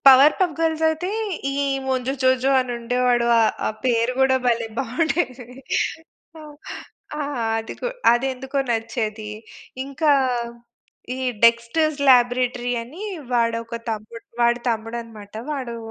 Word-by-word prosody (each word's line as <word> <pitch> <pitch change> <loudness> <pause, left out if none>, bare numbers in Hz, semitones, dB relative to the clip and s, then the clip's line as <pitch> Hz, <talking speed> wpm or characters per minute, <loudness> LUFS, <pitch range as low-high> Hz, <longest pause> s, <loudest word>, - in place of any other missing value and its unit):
Power 270 +3 +9
పప్ 360 -4 +2
గర్ల్సయితే 320 +2 +1 0.4
ఈ - - -3 0.3
ముంజు 260 0 0
జోజో 260 +1 +3
అనుండేవాడు. 245 0 0
ఆహ్, 225 - +4
ఆ - - +2
పేరు 240 -1 +2
గూడా 265 0 +4
భలే 235 -2 +1
బావుండేది. 265 0 -1 1.7
ఆ! - - 0 0.4
అది 225 0 -5
గు - - -1 0.3
అదెందుకో 265 +2 -1
నచ్చేది. 220 -1 -2 0.6
ఇంకా 290 +2 +1 1.0
ఈ - - -7 0.3
డెక్‌స్టర్స్ 235 +7 +3
లాబ్‌రేటరీ 245 0 +3
అని 305 - -10 0.3
వాడొక 230 -1 0
తమ్ముడు 220 +1 -6 0.2
వాడి 235 0 +3
తమ్ముడనమాట. 225 -2 -5 0.2
వాడు 255 -5 -4
245 Hz, 105 wpm, -22 LUFS, 230-270 Hz, 1.7 s, Power